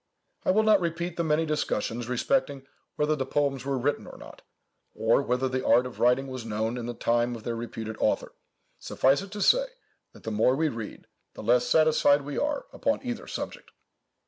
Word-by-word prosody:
I - - -1
will 215 +4 +4
not 215 -3 +5
repeat 170 0 -2
the 170 - -1
many 160 0 +1
discussions 120 -6 -2
respecting 140 - 0 0.3
whether 150 +1 +1
the 135 - -2
poems 135 -1 -1
were 140 -1 -1
written 140 +4 -1
or - - -11
not, - - -13 0.5
or - - +3
whether 125 +2 0
the 130 0 -2
art 120 +2 +4
of 125 - -8
writing 125 +3 +3
was 130 -3 -6
known 110 +1 -2
in 120 -1 -5
the 120 - -4
time 120 +1 +1
of 115 - -10
their 120 - -3
reputed 115 -1 -6
author. - - 0 0.5
Suffice 135 +4 +2
it 200 - -8
to 205 0 -3
say, - - +4 0.5
that - - -16
the 110 - -4
more 110 +5 +3
we 155 +2 +1
read, 115 -5 -7 0.3
the - - -8
less 120 +2 +3
satisfied 155 -2 +4
we 145 0 -6
are 290 -1 -1
upon 280 -1 0
either 245 -1 -4
subject. - - -6
135 Hz, 200 wpm, -27 LUFS, 120-160 Hz, 0.5 s, not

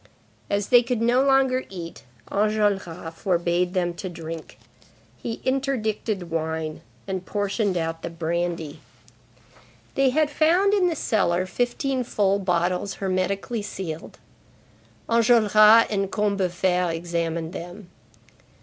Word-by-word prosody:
As 200 0 -1
they 245 -1 +7
could 245 -1 -2
no 240 +3 +3
longer 270 -1 +3
eat, 170 -3 -8 0.3
Enjolras 200 -5 0
forbade 175 +1 0
them 175 -1 0
to 185 +2 -6
drink. 165 -2 -8 0.6
He 225 - -5
interdicted 220 -8 -1
wine, 160 -1 -3 0.3
and 190 -1 -3
portioned 205 0 -1
out 165 -1 -3
the - - -4
brandy. 165 -2 -3 1.1
They 270 -1 +3
had 300 +3 +1
found 350 +7 +3
in 385 -3 +3
the 330 - -2
cellar 185 - +1
fifteen 250 +5 -1
full 200 -4 +1
bottles 180 +1 0
hermetically 195 +4 -2
sealed. 175 -5 -6 0.9
Enjolras 225 -1 +6
and 195 -1 -1
Combeferre 185 -4 0
examined 165 0 -3
them. 180 +1 -9
195 Hz, 115 wpm, -24 LUFS, 170-230 Hz, 1.1 s, they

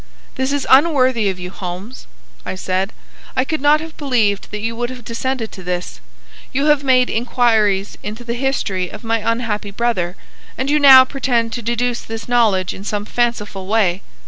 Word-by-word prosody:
"This 265 +1 -1
is 285 -1 -1
unworthy 260 -7 +4
of 190 - -3
you, 180 0 -7
Holmes," 190 +6 -7 0.4
I - - -5
said. 185 +2 -2 0.4
"I 255 - +1
could 310 +1 -3
not 295 +1 +5
have 320 0 -9
believed 230 -9 0
that 210 - -5
you 225 +1 -3
would 240 +1 -2
have 250 -3 -9
descended 235 0 -3
to 190 - -10
this. 180 0 -4 0.5
You 275 +2 0
have 295 -2 +3
made 255 -2 +4
inquires 220 -4 +1
into 215 +4 -7
the 235 0 -3
history 235 -8 -1
of 210 - -10
my 230 0 0
unhappy 225 -2 -2
brother, 200 -5 -1 0.4
and 265 +2 -1
you 300 - +3
now 265 -2 +9
pretend 245 -4 -1
to 240 - -4
deduce 240 +1 -1
this 225 0 -7
knowledge 220 -7 +2
in 195 - -9
some 205 0 -3
fanciful 210 -5 -2
way. 200 -4 +1
230 Hz, 180 wpm, -18 LUFS, 205-260 Hz, 0.5 s, now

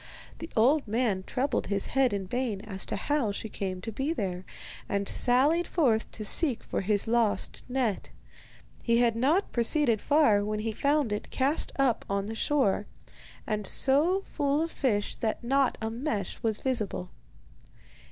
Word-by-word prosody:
The 325 - -7
old 270 +5 +4
man 215 -3 0
troubled 270 +3 -1
his 200 -1 0
head 270 -2 +2
in 200 -2 -2
vain 230 -1 -2
as 200 -3 -5
to - - -2
how 290 -8 0
she 215 +2 -5
came 185 -3 -4
there, 215 - -3 0.4
and 200 0 -1
sallied 285 +8 +3
forth 240 -10 +1
to 215 - -6
seek 270 +2 +1
for - - -2
his 205 +2 0
lost 230 -2 +1
net. 245 -6 -1 0.7
He 235 -1 +2
had 235 -1 +3
not 295 - +1
proceeded 235 -1 +2
far 285 -9 +4
when 210 +1 -2
he 225 +1 -2
found 280 +1 +1
it 210 - -4
cast 275 +4 0
up 270 -4 +2
on 200 0 -1
the 220 - -5
shore, 225 -5 +1 0.6
and 210 -3 -2
so 310 +8 +2
full 290 -4 0
of 330 - -4
fish 210 -7 -1
that 220 0 -2
not 270 +2 +2
a 220 - -2
mesh 225 - -3
was 220 -3 +1
visible. 215 - -2
235 Hz, 160 wpm, -28 LUFS, 210-275 Hz, 0.7 s, old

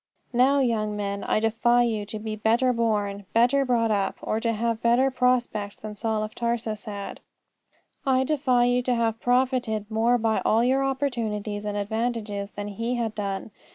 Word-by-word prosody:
Now, 265 +3 +4
young 215 -4 0
men, 200 -1 -3
I - - +1
defy 240 +2 +3
you 215 -3 -1
to 215 - -5
be 215 0 -4
better 230 +4 +2
born, 205 -4 -1
better 245 +5 +4
brought 235 -3 +1
up, 200 -2 0
or 220 - -1
to 230 0 0
have 230 0 -1
better 245 +3 +3
prospects 245 -5 0
than 215 -1 -8
Saul 220 0 -1
of 215 0 -6
Tarsus 235 -2 -2
had. 200 -2 -6 0.8
I 260 -2 +2
defy 260 -4 +2
you 245 0 +2
to 250 0 0
have 225 -1 0
profited 245 -4 +1
more 230 +3 +3
by 225 -1 0
all 225 +2 +3
your 265 +2 +2
opportunities 225 -7 -2
and 205 0 -2
advantages 210 -1 -2
than 205 0 -5
he 230 +5 -2
had 230 -3 -2
done. 200 0 -4
225 Hz, 175 wpm, -25 LUFS, 210-245 Hz, 0.8 s, Now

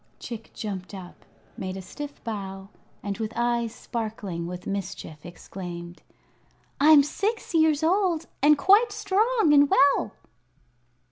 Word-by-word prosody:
Chick 230 -2 -8
jumped 200 -2 -6
up, 180 -2 -11 0.3
made 190 -1 -5
a - - -6
stiff 290 +8 -9
bow, 195 -3 -6 0.3
and 200 +1 -4
with 220 -1 -3
eyes 235 -1 0
sparkling 210 -7 -5
with 180 0 -7
mischief 185 -6 -5
exclaimed: 175 -1 -9 0.8
"I'm 295 0 +7
six 410 +9 -3
years 315 -2 +3
old 345 -1 +2 0.2
and 295 +1 +6
quite 420 +7 +5
strong 430 -2 +2
and 285 -1 +6
well." 280 -6 +3
235 Hz, 125 wpm, -26 LUFS, 190-315 Hz, 0.8 s, I'm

